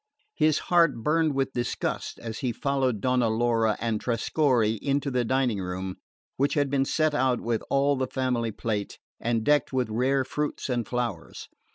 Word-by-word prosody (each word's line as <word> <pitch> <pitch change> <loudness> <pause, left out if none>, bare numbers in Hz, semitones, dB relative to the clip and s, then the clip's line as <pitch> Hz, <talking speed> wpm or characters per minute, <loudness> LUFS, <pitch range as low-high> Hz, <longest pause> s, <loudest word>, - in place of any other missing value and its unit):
His 155 -1 +3 0.2
heart 165 -9 +4
burned 155 -1 +2
with 135 -1 0
disgust 120 -1 -3
as 115 -2 -6
he 125 - -1
followed 130 -3 0
Donna 125 -2 +2
Laura 115 -1 +1
and 115 -2 -1
Trescorre 115 -2 +1
into 140 0 0
the 125 -1 +1
dining 125 -3 +1
room, 95 0 -4 0.4
which 140 +1 +1
had 145 -2 +1
been 135 -1 +2
set 155 +1 +1
out 130 -3 +2
with 115 -1 -1
all 140 +1 +3
the 130 -1 -1
family 125 -3 -1
plate, 105 -2 -3 0.2
and 115 -1 0
decked 145 +4 +2
with 125 -4 -1
rare 130 +4 +2
fruits 150 +1 -3
and 120 -4 -1
flowers. 125 -1 -4
125 Hz, 170 wpm, -26 LUFS, 115-140 Hz, 0.4 s, heart